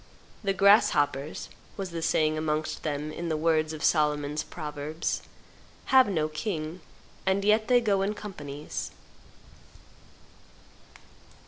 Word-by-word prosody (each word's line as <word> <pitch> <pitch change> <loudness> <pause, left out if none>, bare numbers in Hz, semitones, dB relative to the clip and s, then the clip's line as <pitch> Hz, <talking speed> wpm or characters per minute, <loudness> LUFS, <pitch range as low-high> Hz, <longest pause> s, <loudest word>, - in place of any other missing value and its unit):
"The 195 -1 +1
grasshoppers," 150 -8 +3 0.3
was 190 -3 -4
the 165 -1 -4
saying 155 -1 +2
amongst 155 0 -2
them 150 0 -3
in 170 +2 -4
the 155 - 0
words 155 -1 +2
of 155 -2 -6
Solomon's 150 -1 +2
proverbs, 150 +1 -4 0.7
"have 260 -4 +7
no 160 -5 +1
king, 155 +1 -4 0.4
and 190 +1 +1
yet 215 +1 +4
they 245 -1 +5
go 200 -4 +2
in 205 +2 0
companies." 150 -9 -6
155 Hz, 115 wpm, -28 LUFS, 150-195 Hz, 0.7 s, have